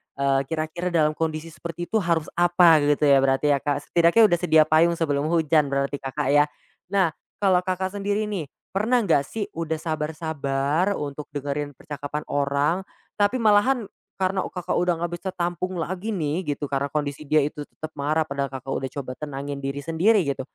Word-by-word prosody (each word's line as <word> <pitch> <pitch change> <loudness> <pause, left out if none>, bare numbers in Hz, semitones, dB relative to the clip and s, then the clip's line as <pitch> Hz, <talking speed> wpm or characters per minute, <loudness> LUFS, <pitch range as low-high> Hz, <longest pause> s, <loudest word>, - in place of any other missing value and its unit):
eee, 135 0 +1
kira-kira 160 +3 -3
dalam 160 -3 +2
kondisi 160 +1 -3
seperti 170 +1 -6
itu 220 - +3
harus 170 -4 0
apa 175 -2 +6
gitu 145 +1 +1
ya 140 -2 +6
berarti 135 +2 +2
ya 140 - +3
Kak, 145 0 -2
setidaknya 170 +6 +5
udah 175 - +3
sedia 160 -3 +5
payung 165 +2 +3
sebelum 145 -2 0
hujan 160 -3 +3
berarti 140 +1 -1
Kakak, 135 +1 -3
ya. 145 0 +5 0.4
Nah 190 -3 +2 0.2
kalau 190 -3 +3
Kakak, 190 +2 -2
sendiri 205 +2 0
nih 170 -8 -3 0.2
pernah 225 +5 +2
nggak 145 -7 +2
sih 220 -2 -3
Udah 160 -1 -3
sabar 155 -1 -3
sabar 155 +4 0
untuk 145 0 -5
dengerin 145 0 -3
percakapan 145 +1 -6
orang 145 +4 +1 0.4
tapi 205 +5 +3
malahan, 220 +4 +4 0.3
karena 190 0 0
Kakak, 180 -2 -4
udah 180 0 +2
nggak 175 - -2
bisa 190 - -4
tampung 175 +1 -2
lagi 185 +5 -3
nih 155 +1 -1 0.2
gitu 145 - -3
karena 140 0 -1
kondisi 145 -1 -3
dia 155 - +3
itu 150 0 -5
tetap 155 0 -8
marah 150 +2 0
padahal 140 -2 -2
Kakak, 135 0 -7
udah 135 - -3
coba 130 -1 -6
tenangin 140 -1 -5
diri 135 +1 -3
sendiri 185 +5 +3
gitu, 140 -1 -2
155 Hz, 180 wpm, -24 LUFS, 145-175 Hz, 0.4 s, apa